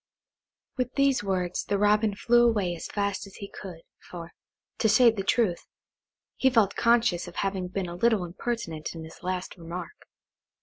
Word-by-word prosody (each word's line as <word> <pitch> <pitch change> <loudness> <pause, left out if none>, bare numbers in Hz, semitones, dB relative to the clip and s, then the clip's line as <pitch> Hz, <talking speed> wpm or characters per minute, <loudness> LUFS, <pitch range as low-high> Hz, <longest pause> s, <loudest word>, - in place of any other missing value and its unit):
With 250 -1 -2
these 275 -5 +3
words 180 -3 -1
the 200 - 0
Robin 210 +1 +3
flew 240 +3 +4
away 195 -6 0
as - - -7
fast 200 -1 -2
as 195 - -14
he 200 - -7
could, 180 -5 -9 0.3
for, 170 -1 -8 0.5
to 220 - +3
say 235 +3 +6
the 215 -3 -4
truth, 195 -4 +1 0.7
he 265 - +4
felt 225 -6 +3
conscious 230 -7 +2
of 175 - -10
having 195 -2 -1
been 185 0 -3
a 170 - -6
little 215 -1 +2
impertinent 175 -4 -4
in 165 - -7
his 160 - -12
last 185 0 -4
remark. 170 0 -7
195 Hz, 170 wpm, -27 LUFS, 180-230 Hz, 0.7 s, say